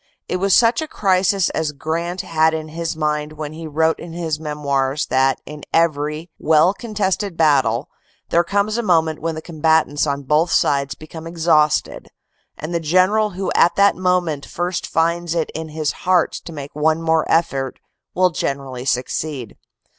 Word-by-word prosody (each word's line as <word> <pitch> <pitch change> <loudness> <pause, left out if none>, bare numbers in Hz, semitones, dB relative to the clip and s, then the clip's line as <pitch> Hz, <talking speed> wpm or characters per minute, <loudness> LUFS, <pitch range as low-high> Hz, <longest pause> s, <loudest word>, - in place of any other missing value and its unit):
It 180 - -1
was 195 +1 +3
such 235 +5 +4
a 315 - -4
crisis 190 - +1
as 155 -2 -2
Grant 170 +5 -3
had 160 0 +2
in 155 0 -5
his 165 0 -4
mind 150 -1 -1
when 155 0 -6
he 160 0 -7
wrote 160 +2 +1
in 170 -1 -9
his 165 -3 -3
memoirs 145 -2 -1
that 135 +1 +2
in 150 0 -9
every 155 0 0
well 160 +4 +4
contested 205 -4 -2
battle 135 -5 +2 0.4
there 170 - +3
comes 200 +5 0
a - - +1
moment 165 -6 +1
when 165 0 -2
the 155 - -7
combatants 160 -2 +1
on 140 0 -2
both 155 +5 +2
sides 140 -1 +1
become 160 +1 -10
exhausted, 160 -3 +1 0.5
and 155 +3 -6
the 170 - +1
general 185 +6 +2
who 190 - -2
at 175 - +4
that 200 0 +4
moment 180 -5 0
first 175 +1 -3
finds 170 +1 0
it 165 -2 -1
in 160 0 -5
his 155 -1 -2
heart 180 -2 +1
to - - -7
make 145 -3 -7
one 155 +2 +1
more 160 -1 +2
effort 135 -6 0 0.4
will 185 0 +3
generally 135 -4 -4
succeed. 130 -1 -2
160 Hz, 170 wpm, -20 LUFS, 150-175 Hz, 0.5 s, such